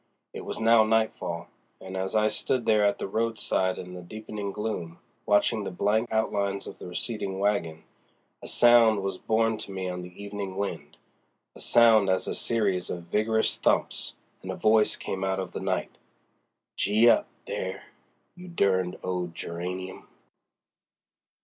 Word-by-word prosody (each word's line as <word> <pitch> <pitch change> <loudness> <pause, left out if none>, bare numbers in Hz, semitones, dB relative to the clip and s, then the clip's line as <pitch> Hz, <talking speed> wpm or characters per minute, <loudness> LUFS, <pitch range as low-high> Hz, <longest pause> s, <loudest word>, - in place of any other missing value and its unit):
It - - -7
was - - -5
now 115 0 +6
nightfall, 110 -6 0 0.3
and 95 0 -8
as 95 +1 -2
I 110 0 +4
stood 120 +2 -1
there 110 -2 +4
at 100 0 +2
the - - -4
roadside 105 -3 0
in 90 0 -8
the 90 - -7
deepening 105 +2 -6
gloom, 100 -6 -4 0.3
watching 105 +1 +3
the - - -3
blank 105 +5 0
outlines 100 -3 0
of - - -9
the - - -8
receding 95 +1 -4
wagon, 95 -6 -1 0.6
a - - -8
sound 115 -4 +5
was 95 -1 -3
borne 110 0 +1
to 110 - -7
me 95 -1 -4
on 90 0 -4
the 90 +1 -11
evening 100 -2 -5
wind—a 100 0 -8
sound 115 -4 +5
as 95 0 +1
of - - -3
a - - -1
series 100 -6 0
of 85 - -4
vigorous 110 +1 +1
thumps—and - - -2
a - - -2
voice 110 0 +3
came 95 0 -4
out 95 0 0
of 95 -1 -4
the - - -5
night: 95 -1 -2 0.8
"Gee 110 +4 +3
up, - - +5 0.2
there, - - -4 0.5
you 180 0 -12
derned 95 - +1
old 90 -2 -3
Geranium." 90 +2 -6
100 Hz, 155 wpm, -27 LUFS, 95-110 Hz, 0.8 s, now